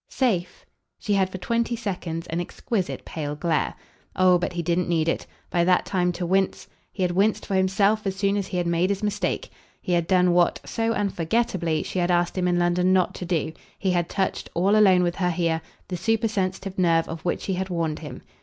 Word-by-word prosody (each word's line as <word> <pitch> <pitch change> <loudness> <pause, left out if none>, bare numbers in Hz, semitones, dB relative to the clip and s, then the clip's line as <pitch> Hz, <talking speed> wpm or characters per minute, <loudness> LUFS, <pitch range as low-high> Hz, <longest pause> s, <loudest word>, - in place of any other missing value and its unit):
"'Safe' 210 - -1 0.2
?" - - -56
She 210 - -1
had 190 -1 +2
for 190 - -6
twenty 235 +5 -1
seconds 180 -7 -4
an 170 +1 -1
exquisite 190 +2 -3
pale 150 -2 -4
glare. 165 +2 0 0.4
Oh 185 -1 +5
but 175 - -2
he 170 -1 -2
didn't 175 +2 0
need 165 -2 +1
it, 165 - -1 0.2
by 175 - +2
that 180 +1 +3
time, 180 -2 +1
to 175 +1 -3
wince; 190 +2 0 0.2
he 190 - -3
had 180 - +1
winced 200 +4 +1
for - - -4
himself 195 +3 +2
as 190 - -1
soon 200 +1 +1
as 200 -2 -1
he 185 - -3
had 175 - 0
made 170 +2 +1
his 200 +1 -2
mistake. 205 -3 -1 0.3
He - - -5
had 170 -1 +2
done 180 -1 +4
what, 175 -1 +3
so 225 0 -1
unforgettably, 180 -4 0
she 185 - -3
had 175 0 +1
asked 175 0 +2
him 180 -1 0
in 175 0 +2
London 175 +1 +2
not 185 -1 +2
to 180 - -6
do; 165 -2 -1 0.2
he 190 - 0
had 175 -1 0
touched, 190 -2 -2
all 195 +5 +3
alone 190 -4 +6
with 175 0 -1
her 180 -2 +1
here, 165 -2 0 0.3
the 180 - -4
supersensitive 195 -2 -1
nerve 165 -2 +3
of 165 -1 -6
which 175 - -1
she 195 - -2
had 190 +1 -2
warned 165 -3 -1
him. 150 -2 -9
180 Hz, 220 wpm, -24 LUFS, 175-195 Hz, 0.4 s, alone